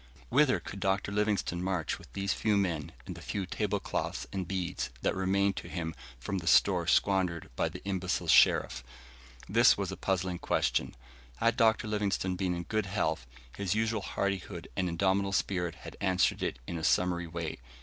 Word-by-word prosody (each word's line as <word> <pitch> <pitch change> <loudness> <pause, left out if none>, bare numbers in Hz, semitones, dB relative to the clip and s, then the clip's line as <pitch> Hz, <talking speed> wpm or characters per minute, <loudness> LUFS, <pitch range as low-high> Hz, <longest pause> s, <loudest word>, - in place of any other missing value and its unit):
Whither 135 +1 +4
could 100 - -8
Dr. 95 +1 0
Livingstone 105 -4 0
march 90 -3 -1
with - - -15
these 100 -1 0
few 105 -2 +1
men, 85 -7 -1
and - - -5
the - - -11
few 100 -2 -3
table 100 +2 -1
cloths - - -3
and 95 -3 -3
beads 90 -5 -2
that - - +2
remained 95 +1 +1
to - - -6
him 80 -2 -3 0.3
from 95 +10 -3
the 80 - -8
store 75 - +4
squandered 95 -4 +2
by - - +1
the - - -10
imbecile 90 -3 -1
Sherif? 65 0 +5 0.6
This 115 +4 +5
was 100 -2 -2
a 95 - -6
puzzling 90 -2 -1
question. - - 0 0.4
Had 115 - +2
Dr. 110 -1 +3
Livingstone 100 -3 0
been 90 -1 -1
in 85 - -4
good 110 +1 -1
health, 60 -8 -1 0.3
his 100 -1 -1
usual 110 -1 0
hardihood 100 -1 -3
and 90 -1 0
indomitable 95 +3 +1
spirit 90 -4 0
had - - -10
answered 95 -2 +2
it - - -1
in 85 - -4
a - - -7
summary 90 0 +2
way. 80 -1 -4
95 Hz, 180 wpm, -31 LUFS, 90-100 Hz, 0.6 s, Sherif